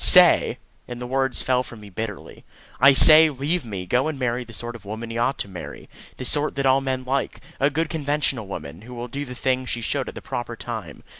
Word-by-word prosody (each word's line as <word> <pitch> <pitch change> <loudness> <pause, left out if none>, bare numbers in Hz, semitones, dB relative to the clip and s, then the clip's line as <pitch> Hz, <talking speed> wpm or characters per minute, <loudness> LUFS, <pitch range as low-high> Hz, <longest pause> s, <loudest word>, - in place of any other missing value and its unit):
"Say!" - - +6 0.3
and 120 0 -7
the 125 - -5
words 135 0 -1
fell 125 -1 +2
from 120 -3 -10
me 105 -1 -12
bitterly 105 +1 -7 0.4
"I 140 +2 +8
say, 155 +3 +9
leave 150 +5 -2
me; 100 -6 -6
go 125 +10 +1
and 155 -3 -3
marry 125 -1 -1
the 120 - -14
sort 120 +2 -6
of 115 - -12
woman 110 +3 -7
you 115 - -3
ought 125 +3 0
to - - -4
marry. 95 -3 -9 0.3
The 130 - -5
sort 150 +3 +2
that 140 0 -1
all 135 +1 +4
men 130 -1 -2
like. 135 +2 -2 0.2
A 140 - +3
good 160 +3 -1
conventional 145 - -1
woman, 80 -3 -8
who 125 +3 -11
will 120 +1 -6
do 140 +4 -5
the 125 -1 -9
things 130 0 -1
she 120 - -3
should - - -2
at - - -11
the - - -6
proper - - -5
time. - - -7
125 Hz, 235 wpm, -23 LUFS, 115-140 Hz, 0.4 s, say